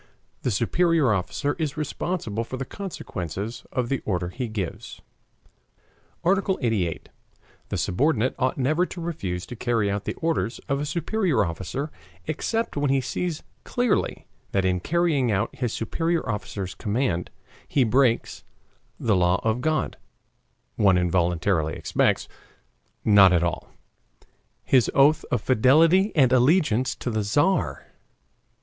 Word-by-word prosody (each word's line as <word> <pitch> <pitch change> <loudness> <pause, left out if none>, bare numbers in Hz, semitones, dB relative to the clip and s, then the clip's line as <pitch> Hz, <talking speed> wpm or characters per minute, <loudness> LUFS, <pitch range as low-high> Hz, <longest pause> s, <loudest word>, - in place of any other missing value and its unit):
The - - 0
superior 140 - +2
officer 125 +9 -1
is 155 -1 -2
responsible 150 - -3
for 130 +3 -6
the 135 - -4
consequences 110 - -6
of 125 -2 -1
the 135 +2 -1
order 90 -3 -1
he 120 +6 -4
gives. 105 -6 -5 1.2
ARTICLE 190 +1 +2
88. 100 - -1 0.6
The - - -2
subordinate 115 - +1
ought 130 -1 0
never 155 +7 +1
to 180 - -8
refuse 100 - -4
to 120 - -8
carry 115 -3 0
out 100 0 -3
the - - -3
orders 160 - -1
of 140 0 0
a 145 - -2
superior 170 - 0
officer 95 - -4 0.3
except 225 - -2
when 145 -1 0
he 135 0 +3
sees 165 +4 -3 0.2
clearly 245 -2 0 0.3
that 95 -1 +2
in 90 -1 +1
carrying 155 - +1
out 100 +2 -1
his 125 -3 -2
superior 165 +10 -1
officer's 100 -4 -4
command, 105 -5 -1 0.4
he 135 - +2
breaks 120 0 +1 0.6
[the 110 -3 +2
law 90 0 +3
of 115 +2 0
God, 155 +2 -1 0.8
one 95 -3 +4
involuntarily 85 -2 +1
expects; - - +1 0.8
not 100 -3 +7
at 85 -1 +3
all] 85 - -2 0.9
HIS 130 -3 +3
OATH 145 +3 +4
OF 125 - +1
FIDELITY 160 - +4
AND 130 -5 +4
ALLEGIANCE 130 - +3
TO 125 - -4
THE 110 -1 0
TZAR. 105 - +1
125 Hz, 135 wpm, -25 LUFS, 100-155 Hz, 1.2 s, not